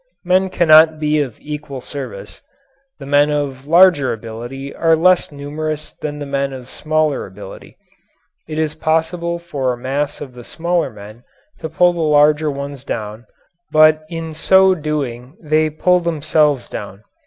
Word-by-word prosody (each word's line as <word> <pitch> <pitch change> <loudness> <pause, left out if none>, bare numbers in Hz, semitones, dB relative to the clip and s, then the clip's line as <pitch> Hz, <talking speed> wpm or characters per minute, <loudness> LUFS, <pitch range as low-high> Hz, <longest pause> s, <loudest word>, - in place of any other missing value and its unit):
Men 185 +1 +2
cannot 160 -2 +5
be 150 0 +1
of 130 -6 -5
equal 150 -2 -7
service. 130 -6 -8 0.6
The - - -10
men 145 +1 +3
of 140 -2 -3
larger 170 -4 +5
ability 120 +5 -7
are 165 -1 +3
less 180 +1 +3
numerous 150 +2 -5
than 150 -1 -6
the 145 - -6
men 140 -1 -2
of 130 -1 -10
smaller 155 -2 -1
ability; 95 0 -12 0.7
it 155 -1 -6
is 155 -1 0
possible 165 +2 -1
for 140 -7 -3
a - - -7
mass 140 +4 -3
of 135 -3 -9
the 120 -1 -11
smaller 170 +5 -1
men 105 +3 -13 0.4
to 160 - -5
pull 175 +3 +3
the 170 - -4
larger 150 0 +3
ones 140 -1 -6
down 110 -1 -6 0.4
but 155 0 +5
in 165 -1 -6
so 190 +4 +5
doing 145 -4 -4
they 155 0 +1
pull 180 +4 +2
themselves 155 -4 +1
down. 100 +1 -8
150 Hz, 155 wpm, -18 LUFS, 135-160 Hz, 0.7 s, cannot